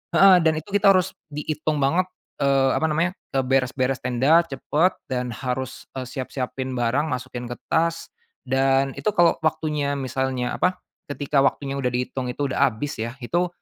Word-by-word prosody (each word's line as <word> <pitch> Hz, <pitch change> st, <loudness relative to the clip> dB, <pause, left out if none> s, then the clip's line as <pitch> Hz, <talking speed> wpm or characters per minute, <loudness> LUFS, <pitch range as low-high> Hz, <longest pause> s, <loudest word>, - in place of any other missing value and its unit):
heeh, 195 Hz, -1 st, +8 dB
dan 160 Hz, -1 st, +4 dB
itu 175 Hz, +6 st, -13 dB
kita 200 Hz, -1 st, +6 dB
harus 185 Hz, -2 st, +1 dB, 0.2 s
diitung 150 Hz, 0 st, -2 dB
banget, 160 Hz, +7 st, +3 dB, 0.4 s
eee, 135 Hz, -1 st, +3 dB
apa -, -, -1 dB
namanya, 170 Hz, +4 st, 0 dB, 0.2 s
eee, 135 Hz, -1 st, +1 dB
beres-beres 130 Hz, 0 st, +1 dB
tenda 135 Hz, +7 st, +4 dB
cepet 155 Hz, +4 st, +1 dB, 0.2 s
dan 125 Hz, -2 st, -2 dB
harus, 130 Hz, +2 st, -4 dB
eee, 130 Hz, -, -3 dB
siap-siapin 130 Hz, 0 st, -4 dB
barang 125 Hz, +6 st, +1 dB
masukin 125 Hz, -2 st, -4 dB
ke 120 Hz, -, -5 dB, 0.2 s
tas, 165 Hz, +1 st, 0 dB, 0.3 s
dan 135 Hz, +1 st, +2 dB
itu -, -, -4 dB
kalau 170 Hz, -1 st, +4 dB
waktunya 155 Hz, -3 st, 0 dB
misalnya 130 Hz, -1 st, -2 dB
apa, 185 Hz, 0 st, +2 dB, 0.3 s
ketika 145 Hz, 0 st, 0 dB
waktunya 135 Hz, 0 st, +1 dB
udah 125 Hz, -, 0 dB
dihitung 125 Hz, +1 st, -2 dB
itu 135 Hz, +2 st, -2 dB
udah 140 Hz, -, +3 dB
habis 125 Hz, +1 st, -4 dB
ya, 115 Hz, +3 st, -3 dB
itu 175 Hz, +8 st, +1 dB
135 Hz, 165 wpm, -23 LUFS, 130-155 Hz, 0.4 s, heeh